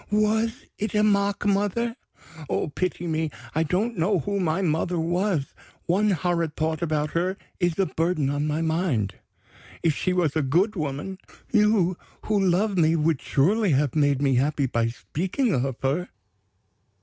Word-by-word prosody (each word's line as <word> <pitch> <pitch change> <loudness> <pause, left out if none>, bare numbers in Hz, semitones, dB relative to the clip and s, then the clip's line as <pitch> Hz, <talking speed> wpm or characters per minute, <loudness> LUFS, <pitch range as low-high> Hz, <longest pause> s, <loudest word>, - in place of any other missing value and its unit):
Was 220 +4 +1
it 215 +1 -2
a 210 - +4
mock 200 -1 +2
mother? 205 +4 +1 0.5
Oh, - - -1
pity 175 +3 -2
me! 160 -1 -1 0.2
I 160 - +1
don't 185 +7 0
know 190 +4 +2
who 200 +6 -2
my 180 +1 0
mother 170 +1 0
was. 175 -2 0 0.3
One 200 +5 +2
horrid 170 -3 0
thought 160 0 -1
about 155 -2 0
her 185 +3 -1 0.2
is 175 -3 +1
a 195 - +3
burden 165 -4 0
on 145 +1 -1
my 155 +2 -1
mind. 160 - 0 0.7
If 165 -2 +3
she 185 - 0
was 175 -5 +1
a 160 - +2
good 175 +11 +2
woman, 155 +4 -4 0.3
you 210 -5 +3 0.3
who 210 -2 +1
love 190 +2 +2
me 160 0 +4
would 155 -2 +1
surely 190 +6 +2
have 140 0 +1
made 145 -2 +2
me 135 -1 +3
happy 140 +2 +1
by 115 -2 0
speaking 185 - -2
of 135 -1 0
her?" 145 +7 0
170 Hz, 160 wpm, -25 LUFS, 150-200 Hz, 0.7 s, a